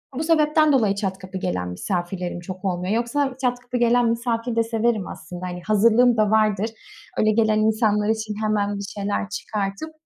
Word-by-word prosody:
Bu 300 - -2
sebepten 310 -1 +3
dolayı 215 -7 +3
çat 195 -2 -2
kapı 185 0 -8
gelen 90 - -2
misafirlerim 175 - -3
çok 185 +2 -8
olmuyor. 180 +1 -1
Yoksa 255 +3 0
çat 245 -1 0
kapı 245 0 -4
gelen 240 0 +3
misafir 230 0 -1
de 230 - +3
severim 225 -2 0
aslında. 175 +3 -8
Hani, 180 -1 -5
hazırlığım 230 +3 +4
da 215 -1 +2
vardır. 215 -1 +2 0.5
Öyle 215 0 +3
gelen 215 -1 +2
insanlar 215 -1 +2
için 220 -1 -1
hemen 205 -1 0
bir 200 - -5
şeyler 205 0 -2
çıkartıp 200 +7 -4
215 Hz, 175 wpm, -23 LUFS, 195-235 Hz, 0.5 s, hazırlığım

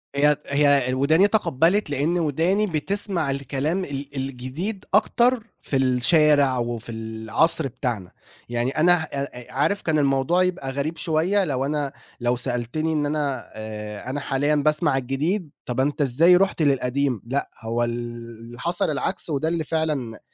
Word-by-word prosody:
هي 150 +1 +4
هي 140 -3 +3
وداني 155 +9 +4
تقبّلت 195 - +2
لأن 150 +5 0
وداني 170 +7 +1
بتسمع 180 -1 0
الكلام 140 +6 -2
ال 140 -1 -7
الجديد 135 - -4
أكتر 235 +3 +3
في 135 - -1
الشارع 135 +2 +4
وفي 120 -1 -3
العصر 110 +8 0
بتاعنا. 115 -8 -4 0.4
يعني 120 +2 -1
أنا 175 +3 +6
أ - - -6
أ 140 -3 -5
عارف 150 +10 +1
كان 155 -2 +1
الموضوع 140 +6 +2
يبقى 175 -7 -2
غريب 140 +5 -3
شوية 175 +5 +1
لو 135 -6 -1
أنا 145 -1 -2 0.3
لو 120 0 +1
سألتني 125 +6 -1
إن 150 -1 0
أنا 145 -5 -2
آآ 105 +1 -7
أنا 140 +3 -2
حاليًا 145 +2 0
باسمع 150 -1 +2
الجديد، 150 +8 -1 0.2
طَب 125 +1 -3
أنت 145 +3 0
إزاي 150 +7 +5
رُحت 190 -2 +2
للقديم؟ 135 -4 +1
لأ، 135 +4 -2
هو 115 +1 -1
اللي 120 0 -6
حصل 170 +4 0
العكس 170 +5 -1
وده 155 +1 -1
اللي 165 0 -1
فعلًا 150 -8 -2
140 Hz, 150 wpm, -23 LUFS, 125-160 Hz, 0.4 s, أنا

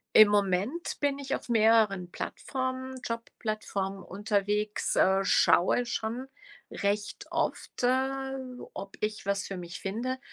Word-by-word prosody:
Im 215 -1 +10
Moment 205 - 0
bin 285 -1 +1
ich 280 -1 -2
auf - - -5
mehreren 220 -5 +4
Plattformen 260 +4 -4
Jobplattformen 215 -4 -3
unterwegs, 210 +1 0
äh, 190 +1 +4
schaue 180 +7 +4
schon 235 +3 -3 0.4
recht 205 +1 -2
oft, - - -2
äh, 265 +2 +1 0.4
ob 195 0 -8
ich 215 0 -2
was 200 0 0
für 195 - -5
mich 175 0 -7
finde 240 +7 -2
215 Hz, 120 wpm, -29 LUFS, 195-255 Hz, 0.4 s, Im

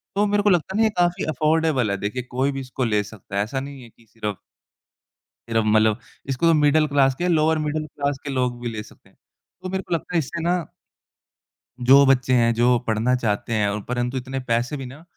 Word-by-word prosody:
तो 205 +1 +3
मेरे 205 0 +1
को 205 - +4
लगता 180 +1 +1
है - - 0
ना, - - +5
ये 220 - +4
काफ़ी 175 +1 +1
अफ़ोर्डेबल 155 -7 +1
है, 100 - -1
देखिए 105 +6 -3
कोई 130 +3 0
भी 135 - -5
इसको 130 0 -4
ले 105 -2 +1
सकता 100 -1 -11
है, 100 - +2
ऐसा 125 +6 -3
नहीं 140 0 -8
है 120 - -13
कि 115 - -25
सिर्फ़ 105 -4 -5 1.1
सिर्फ 115 -1 +2
मतलब 110 +1 +3 0.3
इसको 135 +5 0
तो 165 - +5
मिडल 150 0 +3
क्लास 135 -2 +3
क्या, 175 +6 -2
लोअर 160 -2 +3
मिडल 155 +1 -2
क्लास 140 0 -2
के 145 - -5
लोग 125 -2 -1
भी 120 - -4
ले 110 -2 -5
सकते 105 - -19
हैं, - - -31 0.5
तो 185 - -4
मेरे 190 +1 -3
को 180 - -4
लगता 170 +2 -3
है - - +4
इससे 165 +3 -4
ना 175 +2 +2 1.2
जो 135 +3 +6
बच्चे 130 -1 +3
हैं, 115 -1 +4
जो 120 +2 +3
पढ़ना 115 +3 +1
चाहते 115 0 -2
हैं 105 -2 +2
और 105 +1 -3
परंतु 125 +1 -2
इतने 130 +1 -4
पैसे 125 +3 -1
भी 135 - -6
ना, 135 +5 -11
130 Hz, 230 wpm, -23 LUFS, 115-155 Hz, 1.2 s, जो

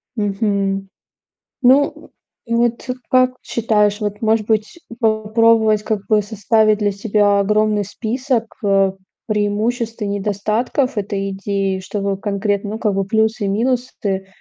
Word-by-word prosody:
мгм. 200 -2 -1 0.7
Ну, 270 +3 +3 0.4
вот, 235 +1 0
э, - - 0 0.2
как 255 0 +4
считаешь, 210 -2 +1
вот, 210 0 -3
может 220 -1 +2
быть, 220 +8 -1 0.2
попробовать, 220 -1 +3
как 210 -2 -3
бы 215 -1 +3
составить 215 +1 +2
для 205 -1 +1
себя 205 0 +2
огромный 210 +1 +2
список, 235 +4 -2 0.2
э, 195 -1 +3 0.3
преимуществ 220 +2 -1
и - - 0
недостатков 210 +6 -1
этой 200 -1 -2
идеи? 195 0 -2
Чтобы 200 +1 -3
конкретно, 205 0 -1
ну, 220 - -4
как 210 -3 0
бы, 195 0 0
плюсы 220 +2 0
и - - -1
минусы, 220 -3 -1
210 Hz, 130 wpm, -19 LUFS, 200-225 Hz, 0.7 s, как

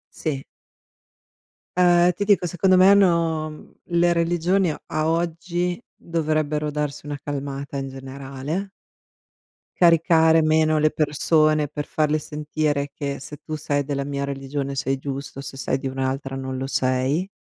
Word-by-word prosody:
Sì. 140 -4 -3 1.3
Ehm, 175 0 +5
ti 205 - -3
dico, 200 -3 +3
secondo 185 +2 +3
me 185 +1 +7
hanno 170 -5 +3
mhmm, 155 - -13 0.3
le 175 0 +4
religioni 175 +2 +1
a - - -9
a 155 0 -1
oggi 175 +2 -1 0.2
dovrebbero 155 -2 -1
darsi 150 0 -3
una 145 -1 -4
calmata 140 -1 -5
in 135 0 -3
generale 135 +7 -5 1.1
caricare 165 -1 +5
meno 155 0 +3
le 155 0 +3
persone 155 0 +2
per 150 0 -5
farle 155 -3 +1
sentire 150 -1 -2
che 140 -2 -4
se 145 +2 -9
tu 155 -1 -4
sei 145 -1 -1
della 140 -1 -2
mia 140 0 -3
religione 140 0 -4
sei 135 0 -1
giusto, 135 0 -6
se 135 -1 -8
sei 130 0 -1
di 135 - -6
un'altra 135 +1 -3
non 130 -1 -4
lo 135 - -3
sei, 130 +6 0
150 Hz, 145 wpm, -23 LUFS, 140-165 Hz, 1.3 s, me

